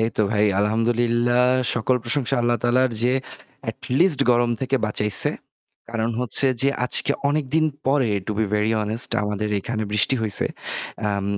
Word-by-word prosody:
এইতো 110 -1 0
ভাই 105 -1 +2 0.2
আলহামদুলিল্লাহ 120 +3 +1 0.3
সকল 125 +2 +1
প্রশংসা 130 +2 0
আল্লাহ 120 0 +2
তায়ালার 125 +2 +2
যে 125 +1 +2 0.6
এটলিস্ট 145 +3 0
গরম 120 0 +2
থেকে 135 +1 0
বাঁচাইছে। 105 -1 +1 0.6
কারণ 115 0 -1
হচ্ছে 125 +2 +1 0.2
যে 140 - +3 0.2
আজকে 125 - +1 0.2
অনেকদিন 155 +1 +1 0.2
পরে 135 -4 +2 0.2
to 110 - -2
be 110 - +2
very 105 +1 +1
honest 110 +3 0
আমাদের 105 +1 -2
এইখানে 110 +2 -3
বৃষ্টি 105 +5 +2
হইছে। 110 -2 +1 0.6
আম 100 -1 -2
120 Hz, 140 wpm, -22 LUFS, 110-130 Hz, 0.6 s, যে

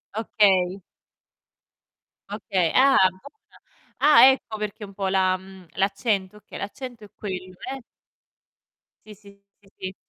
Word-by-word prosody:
Okay. 195 -4 +2 1.5
Okay, 195 -5 -1
ah 270 +1 +5
buona! 280 - -18 0.4
Ah, 295 -3 +7
ecco 225 -4 -5
perché 210 0 -5
un 195 - -14
po' 195 -1 -3
la 185 -1 +2
mhmm, 190 -1 -15
l'accento. 200 0 -1
Okay, 210 - -12
l'accento 235 +2 -8
è 205 - -13
quello, 185 -2 -7 0.2
eh. 265 -3 -9 1.2
Sì, 215 - -11
sì, 200 0 -19 0.2
sì, 200 - -25
sì. 185 0 -6
200 Hz, 125 wpm, -24 LUFS, 190-220 Hz, 1.5 s, Ah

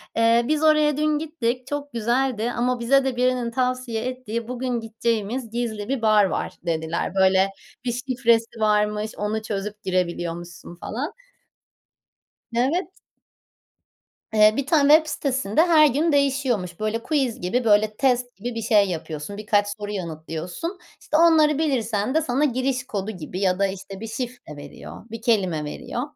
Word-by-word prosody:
eee, 230 +1 +4
"Biz 310 0 +1
oraya 305 -2 +4
dün 305 0 +2
gittik. 255 -6 -3
Çok 290 -1 -5
güzeldi 240 0 0
ama 245 0 0
bize 270 +3 +3
de 260 -2 -1
birinin 250 -1 +1
tavsiye 250 -2 -1
ettiği 235 -3 -4
bugün 250 -1 -2
gideceğimiz 225 +1 -2
gizli 225 -2 -3
bir 270 -4 -1
bar 215 -2 +5
var." - - -2
dediler. 160 +2 -2
Böyle, 190 0 +4 0.4
bir 240 - 0
şifresi 235 -2 0
varmış. 210 0 +1
Onu 210 +1 -2
çözüp 210 0 -5
girebiliyormuşsun 175 -1 -3
falan. 255 - -5 1.4
Evet. 275 +10 +1 1.5
Eee, 215 0 +6
bir 280 - 0
tane 295 -2 +5
web 315 0 +2
sitesinde 260 -2 0
her 320 -3 +6
gün 300 +5 +1
değişiyormuş. 260 -11 0
Böyle 215 +2 -2
quiz 270 - 0
gibi, 235 +8 0
böyle, 215 0 +3
test 250 -1 +1
gibi 240 0 -5
bir 225 - -3
şey 210 -3 +3
yapıyorsun 160 +3 -5
birkaç 205 -1 +1
soru 205 0 -5
yanıtlıyorsun. 170 - -5 0.2
İşte, 305 - 0
onları 315 -3 +5
bilirsen 250 -5 0
de 320 - +4
sana 275 +1 +1
giriş 255 0 0
kodu 205 +1 -3
gibi 180 0 -7
ya 185 -1 +1
da, 200 - +3
işte, 195 0 -8
bir 225 - -6
şifre 240 - -6
veriyor 145 +7 -10
bir 230 -1 -6
kelime 190 -10 +1
veriyor. 235 +10 -5
230 Hz, 150 wpm, -23 LUFS, 205-260 Hz, 1.5 s, Eee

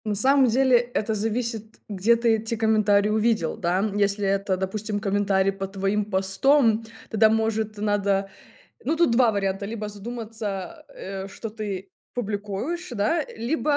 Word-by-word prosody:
На 210 -1 -1
самом 265 +5 +4
деле, 255 +1 +4
это 235 -2 -1
зависит, 225 +1 -3
где 205 +3 +2
ты 230 -1 +2
эти 225 +1 -3
комментарии 215 -2 +3
увидел 215 -5 +1
да, 175 +2 0
м, 205 0 -1
если 200 0 +1
это, 195 -1 0
допустим, 205 +2 -2
комментарий 195 -1 +1
под 195 0 -6
твоим 200 +1 0
постом, 215 +5 +3 0.3
тогда 220 0 +4
может 220 -1 0
надо 200 -1 0 0.6
Ну, 310 +6 0
тут 335 -3 +3
2 235 -1 +5
варианта: 195 -1 -1
либо 215 +1 -4
задуматься, 210 -3 -6
а, - - -35 0.4
э, - - -8
что 225 +3 -7
ты 200 -3 -5 0.2
публикуешь, 215 - -3
да 245 +8 0
либо, 290 +6 0
215 Hz, 155 wpm, -24 LUFS, 200-230 Hz, 0.6 s, 2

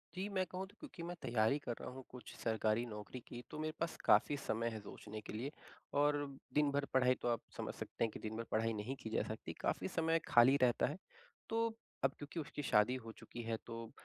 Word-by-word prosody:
जी, 190 +2 -1
मैं 190 -2 +1
कहूँ 185 +2 -4
तो 200 - -19
क्योंकि 260 - -8
मैं 175 +1 -3
तैयारी 120 +1 +3
कर 120 - -3
रहा - - -4
हूँ 130 +1 -8
कुछ 125 -1 -9
सरकारी 110 0 +2
नौकरी 105 +2 -6
की, 120 - -6
तो - - -5
मेरे 155 0 -1
पास 165 0 0
काफ़ी 145 - +6
समय 115 -3 0
है 110 -1 -4
सोचने 105 +1 -7
के - - -7
लिए। 125 +7 -2 0.5
और 145 0 +5 0.4
दिन-भर 145 -1 +3
पढ़ाई 130 -1 +5
तो - - 0
आप 120 -1 +2 0.2
समझ - - -2
सकते - - -3
हैं 115 - +3
कि, - - -7
दिन-भर 110 +1 -3
पढ़ाई 115 +1 +2
नहीं 110 +5 -2
की 110 - -4
जा 110 - +2
सकती 110 - -4
काफ़ी - - +1
समय 165 0 +2
खाली 120 +3 +8
रहता 125 -2 +5
है। 150 - -3 0.5
तो 230 0 +3 0.4
अब 135 - +5
क्योंकि 145 +3 -5
उसकी 150 -1 -4
शादी 110 0 +5
हो 115 - -6
चुकी 120 - -7
है, 115 0 -1
तो 115 -1 -6
125 Hz, 220 wpm, -38 LUFS, 110-150 Hz, 0.5 s, खाली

